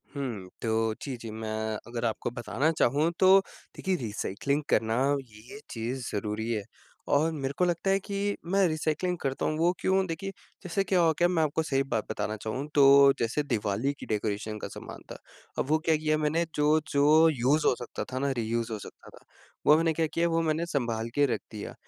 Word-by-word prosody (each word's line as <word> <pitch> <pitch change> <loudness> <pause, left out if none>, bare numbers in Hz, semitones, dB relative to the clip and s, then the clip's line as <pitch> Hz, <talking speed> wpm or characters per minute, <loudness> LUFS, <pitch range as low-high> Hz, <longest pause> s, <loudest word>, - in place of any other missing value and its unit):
हुँ। 115 -10 -4
तो 110 -1 +1
जी, 135 -3 -4
जी, 115 -1 -8
मैं 110 0 -5 0.4
अगर 120 0 -3
आपको 115 +1 -1
बताना 130 +6 0
चाहूँ 155 +1 +2
तो 190 +1 +7 0.4
देखिए 190 -1 -1
रिसाइक्लिंग 115 +6 -2
करना 110 +1 +2 0.4
ये 110 - -12
चीज़ 120 +2 -4
ज़रूरी 105 +2 -2
है 110 -3 -1 0.5
और 155 +3 +3
मेरे 140 -3 -3
को 180 - +3
लगता 175 +2 0
है 195 - +3
कि 200 +1 -2
मैं 190 +2 +3
रिसाइक्लिंग 160 +3 -1
करता 135 -1 -2
हूँ 155 - 0
वो 170 +2 +3
क्यों? 190 0 +2
देखिए 175 +4 -4 0.3
जैसे 185 +2 0
क्या 190 -1 +1
हो 165 -1 +4
गया 175 - +5
मैं 175 -3 +1
आपको 155 +1 0
सही 135 -3 +1
बात 115 -6 -2
बताना 110 0 -2
चाहूँ 110 +7 -4
तो 140 -1 +7
जैसे 115 +6 0
दिवाली 115 0 -1
की - - -7
डेकोरेशन 105 0 -2
का - - -5
सामान - - -9
था। - - -7 0.5
वो 155 +4 +2
क्या 160 - +4
किया 155 0 +1
मैंने 155 +2 +1
जो-जो 150 +1 +4
यूज़ 145 +2 +1
हो - - +5
सकता 120 - -5
था 130 - -2
ना 140 +1 0
रियूज़ 115 0 -1
हो 110 - -2
सकता - - -12
था, - - -17 0.4
वो 150 - +7
मैंने 165 0 +2
क्या 160 +1 +1
किया? 165 +2 0
वो 165 0 +1
मैंने 160 +1 0
सँभाल 115 -8 -2
के 145 - +4
रख - - -2
दिया। 105 -2 -7
140 Hz, 195 wpm, -28 LUFS, 115-165 Hz, 0.5 s, तो